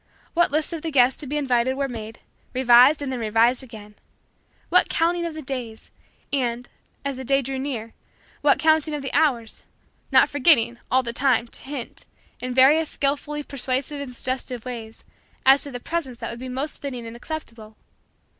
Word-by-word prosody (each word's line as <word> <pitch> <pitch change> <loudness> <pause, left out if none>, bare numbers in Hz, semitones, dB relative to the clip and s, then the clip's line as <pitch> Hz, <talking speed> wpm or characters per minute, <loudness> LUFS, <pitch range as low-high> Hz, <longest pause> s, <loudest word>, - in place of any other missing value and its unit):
What 345 0 +3
lists 310 +3 -1
of 325 - -4
the 325 - -3
guests 260 -3 +3
to 295 - -3
be 295 +3 -2
invited 260 -2 +1
were 275 0 -1
made, 225 -3 -8 0.3
revised 255 +4 +6
and 270 - -3
then 255 - -3
revised 230 +3 +3
again! 215 -4 -12 0.8
What - - +4
counting 340 +1 +1
of 325 - -7
the 310 - -7
days, 250 -4 -6 0.4
and, 245 -3 -1 0.4
as 280 -2 -2
the 260 - -6
day 275 +2 +2
drew 265 +1 -4
near, 240 -5 -4 0.5
what 290 -1 +4
counting 315 -1 +2
of 290 - -5
the 270 - -4
hours; 265 -7 +1 0.5
not - - +6
forgetting, 255 -5 +3
all 260 0 +3
the 235 -1 -4
time, 245 -2 +2
to - - -2
hint, 270 -3 -7 0.3
in 255 - -4
various 290 +5 +5
skillfully 290 +1 -2
persuasive 275 +1 -2
and 255 -3 -7
suggestive 255 -1 -4
ways, 230 -3 -8 0.4
as 270 +1 +7
to 285 - -6
the 245 - -6
presents 265 -4 -4
that - - -4
would 235 - -8
be 255 +1 -6
most 270 +4 -4
fitting 250 -4 -5
and 230 0 -8
acceptable! 230 -6 -8
260 Hz, 185 wpm, -23 LUFS, 240-290 Hz, 0.8 s, as